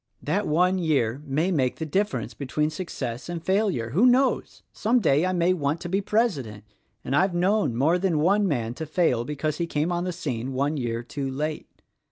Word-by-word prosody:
"That - - 0
one 180 +4 +2
year 140 -7 0
may 155 +7 0
make 130 -7 +1
the 160 - -4
difference 200 +7 -1
between 150 +3 -1
suc 175 +3 -6
cess 125 +3 -5
and 170 -1 -5
failure. 190 - 0
Who 200 - +4
knows? 255 +1 +1
Some 240 +3 +2
day 160 -3 +3
I - - 0
may 180 0 +2
want 150 -2 -1
to 175 - -5
be 195 +3 +1
President; 150 - -1 0.4
and 135 - -1
I've 185 +3 +2
known 185 - +2
more 155 +8 +2
than 180 -4 +1
one 195 +6 +3
man 120 -8 -1
to 160 +5 -6
fail 155 -7 +1
because 150 +2 -2
he 170 - -1
came 155 +2 -1
on 175 0 -1
the 180 - -2
scene 135 -7 -4
one 140 +4 0
year 120 -4 -2
too 135 +2 -4
late. 150 +3 -3
155 Hz, 205 wpm, -25 LUFS, 135-185 Hz, 0.4 s, Who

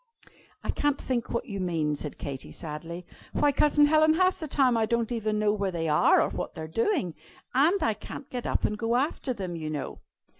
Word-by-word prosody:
"I - - 0
can't 290 -1 0
think 245 -3 -2
what 235 - -2
you 200 -2 -5
mean," 165 -5 0
said 145 0 -7
Katy, 135 -2 -6
sadly. 165 +3 -7 0.3
"Why, 290 - +3
Cousin 295 +1 +4
Helen, 310 +1 +5
half 370 +1 +2
the 315 - -4
time 265 -4 +3
I 220 -1 +2
don't 235 0 0
even 215 -2 -1
know 210 -1 +2
where 200 -2 -1
they 165 -3 -2
are, 150 -1 +5
or - - -1
what - - -5
they - - -6
are - - -5
doing. 225 - 0 0.4
And 320 +10 +3
I 225 - +2
can't 215 +6 -9
get 245 -1 -4
up - - +1
and 210 0 -2
go 230 +1 +1
after 270 0 0
them, 190 -7 -4
you 155 -2 -4
know." 150 -3 -4
220 Hz, 220 wpm, -28 LUFS, 170-280 Hz, 0.4 s, Helen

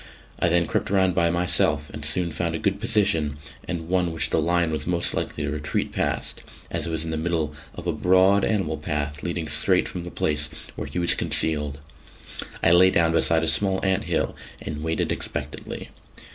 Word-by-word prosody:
I 85 - +3
then 85 0 +3
crept - - -1
round 95 -2 +3
by 85 -1 +2
myself 80 -3 +2
and 75 - -6
soon 85 +3 0
found 85 +1 -2
a - - 0
good 100 0 -1
position 95 -10 +1 0.3
and 80 -2 -4
one 90 -1 +1
which 80 - +1
the - - +2
lion 85 -1 +1
was 75 0 -3
most 85 -1 +1
likely 75 - -2
to 75 - -2
retreat 75 -1 -2
past, - - -2 0.3
as - - -2
it - - -2
was 80 -1 0
in 80 - -3
the 80 - -2
middle 80 -2 -1 0.2
of 85 - -8
a 85 - 0
broad 95 +4 +4
animal 90 -8 0
path 75 -1 -3
leading 85 -2 -3
straight 80 +5 +2
from 90 -2 -6
the 90 - -6
place 75 -2 0 0.3
where - - -5
he - - -6
was 85 -1 +2
concealed. 75 -2 -1 0.8
I - - +5
lay 90 +2 +7
down 85 -3 +3
behind 80 0 +4
a - - 0
small 95 +2 +3
ant 95 0 +1
hill, - - -1 0.2
and 75 - -6
waited 80 +1 -1
expectantly. 75 0 -5
85 Hz, 200 wpm, -24 LUFS, 75-90 Hz, 0.8 s, lay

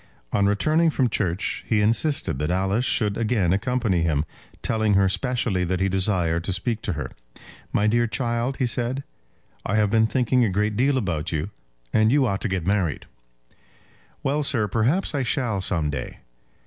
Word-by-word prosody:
On 100 -1 +3
returning 155 +11 +2
from 130 -5 +1
church 95 -2 -2
he 110 - +2
insisted 115 - +1
that 75 +1 -1
Alice 95 +6 0
should 105 -4 0
again 105 -6 +1
accompany 105 -3 0
him, 80 -3 +1 0.4
telling 110 -2 +1
her 95 0 +4
specially 120 -3 0
that 90 +1 -1
he 95 - +2
desired 90 -4 0
to 95 - 0
speak 110 +4 -2
to 100 - -2
her. 75 -4 -5 0.6
"My 105 - +1
dear 120 +2 +2
child," 120 +2 -1
he 130 - +1
said, 125 +3 -1 0.6
"I 110 - -1
have 105 -2 +2
been 110 0 +4
thinking 125 +1 +2
a 115 - +2
great 105 +2 0
deal 135 +4 +2
about 85 -9 -2
you, 80 +5 -2 0.4
and 110 +1 +4
you 140 -1 +3
ought 100 -4 -1
to - - -1
get 95 -3 -2
married." 95 -7 0 1.2
"Well, 145 +3 0
sir, 130 -7 +1
perhaps 120 - +1
I 140 - 0
shall 120 -5 -1
some 80 -6 +1
day." 70 - -5
105 Hz, 175 wpm, -24 LUFS, 95-125 Hz, 1.2 s, her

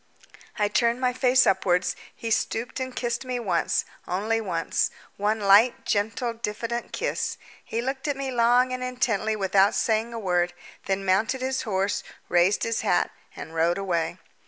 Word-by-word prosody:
I 210 -2 +2
turned 235 +3 +1
my 250 -1 +1
face 255 0 +4
upwards; 185 -2 +2 0.2
he 230 - -5
stooped 225 +3 -1
and 260 -1 -4
kissed 240 0 -2
me 255 -1 -3
once 185 -7 0 0.2
only 215 +5 0
once 170 -6 0 0.3
one 210 +2 0
light, 205 +4 +5
gentle, 225 +3 0
diffident 230 +1 -4
kiss. - - -2 0.3
He 230 +1 -3
looked 265 +2 -3
at 285 -2 -1
me 270 -1 -3
long 245 +1 +3
and 255 0 -3
intently 230 -4 0
without 195 0 +3
saying 225 +1 +1
a 230 - -5
word, 175 -4 0 0.3
then 195 0 -1
mounted 215 +7 +1
his 265 0 -1
horse, 195 0 0 0.3
raised 175 +3 +3
his 230 -1 -1
hat, - - +1 0.2
and 160 - -8
rode 165 +2 +2
away. 175 -3 -1
220 Hz, 160 wpm, -25 LUFS, 195-245 Hz, 0.3 s, light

